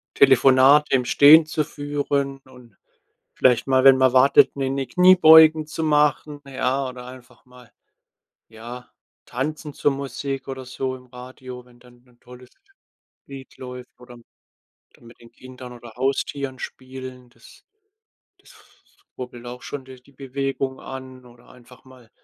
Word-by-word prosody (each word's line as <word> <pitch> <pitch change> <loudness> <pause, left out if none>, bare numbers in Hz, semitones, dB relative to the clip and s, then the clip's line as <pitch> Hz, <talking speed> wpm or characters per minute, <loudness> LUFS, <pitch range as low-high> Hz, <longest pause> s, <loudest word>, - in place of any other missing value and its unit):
Telefonate 135 +2 +4
im 125 -1 0
Stehen 155 +5 +6
zu 155 -1 -2
führen 145 -2 -4
und 125 -5 -19 0.6
vielleicht 125 +1 +2
mal, 130 0 +2
wenn 135 -1 +7
man 130 -1 +2
wartet, 135 +2 +4
'ne 135 -1 -2
'ne 135 -1 -4
Kniebeugen 160 -2 +6
zu 160 +1 -5
machen, 150 -1 0
ja, 130 0 -2
oder 125 -1 -11
einfach 125 -1 -15
mal, 125 -1 -19 0.8
ja, 120 +2 -11 0.4
tanzen 150 +4 -5
zur 145 - 0
Musik 135 0 -6
oder 130 -1 -7
so 130 +1 -5
im 125 - -18
Radio, 125 0 -12
wenn 120 -1 -23
dann 125 0 -22
'n 120 -1 -28
tolles 125 0 -16 0.8
Lied 135 -1 -13
läuft, 125 -1 -11
oder 125 0 -14
m 120 - -18 0.8
mit 115 0 -18
den 115 - -18
Kindern 130 -1 -13
oder 120 -2 -14
Haustieren 135 0 -3
spielen. 130 -1 -10
Das - - -20 0.8
das - - -21 0.7
rubbelt 125 -1 -9
auch 125 +1 -9
schon 140 -2 -8
de 130 -1 -14
die 140 +2 -24
Bewegung 135 0 -5
an 130 -1 -11
oder 120 -1 -20
einfach 125 +1 -19
mal, 130 -3 -19
130 Hz, 145 wpm, -21 LUFS, 125-140 Hz, 0.8 s, wenn